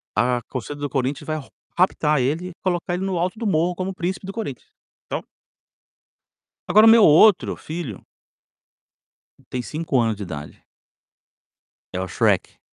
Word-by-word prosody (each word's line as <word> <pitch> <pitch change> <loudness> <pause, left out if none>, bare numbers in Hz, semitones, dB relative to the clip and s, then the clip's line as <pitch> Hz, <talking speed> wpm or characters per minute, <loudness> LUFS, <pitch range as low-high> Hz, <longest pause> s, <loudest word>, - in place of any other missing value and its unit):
a 120 0 +2
torcida 130 +3 -5
do 145 -1 -4
Corinthians 135 +1 -2
vai 155 0 -1
ro 140 - -9 0.3
raptar 155 -5 +2
ele 155 +8 -1
e - - -9
colocar 175 -1 -1
ele 190 +2 -3
no 190 -2 -1
alto 180 +5 -1
do 230 - -2
morro, 175 -1 +2
como 185 +2 -3
príncipe 185 +1 -3
do 195 - -6
Corinthians, 205 - -6 0.4
então - - -3 1.5
Agora 215 +2 +6
o - - +10
meu 225 -1 +7
outro 175 +4 +6
filho 155 - -7 1.5
tem 125 - -3
5 150 0 -1
anos 115 -2 +1
de 100 - -7
idade 75 -5 -8 1.3
é 90 - -2
o 95 - -3
Shrek - - 0
160 Hz, 155 wpm, -22 LUFS, 130-185 Hz, 1.5 s, o